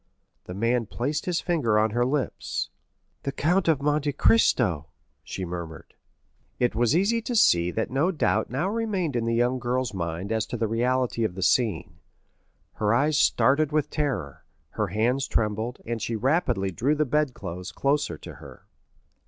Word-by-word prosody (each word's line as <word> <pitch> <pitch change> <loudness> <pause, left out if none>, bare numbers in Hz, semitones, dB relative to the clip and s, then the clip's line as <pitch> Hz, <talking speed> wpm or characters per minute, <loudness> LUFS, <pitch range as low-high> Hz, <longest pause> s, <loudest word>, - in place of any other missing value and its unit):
The 90 - -7
man 115 +2 0
placed 140 - -3
his 175 -2 0
finger 140 -12 +1
on 110 0 +2
her 120 +2 +1
lips. 135 +1 -2 0.5
"The 140 - -3
Count 170 +6 +1
of 150 -4 +2
Monte 145 0 +1
Cristo!" 95 - +3 0.4
she 95 - -5
murmured. 85 -2 -7 0.6
It 125 - +1
was 120 +5 +2
easy 210 +6 +2
to 240 +2 -3
see 85 - +4
that 110 +7 -2
no 140 +7 +2
doubt 145 - 0
now 135 +9 -1
remained 200 - -1
in 115 -1 0
the 115 0 0
young 120 +2 +1
girl's 125 -1 -1
mind 85 +2 -4
as 110 -1 0
to 120 - -4
the 115 - 0
reality 120 +1 0
of 95 -5 -1
the 95 - -3
scene; 85 -8 +1 0.8
her 105 -1 +1
eyes 145 +4 +2
started 145 +2 +3
with 150 -1 0
terror, 120 - -3 0.3
her 105 -2 -1
hands 120 +8 0
trembled, 110 +2 -1
and 115 -1 -3
she 115 +3 -2
rapidly 125 - +1
drew 130 - +1
the 150 0 +1
bedclothes 125 - -2
closer 140 - 0
to - - -10
her. - - -13
120 Hz, 170 wpm, -26 LUFS, 105-150 Hz, 0.8 s, see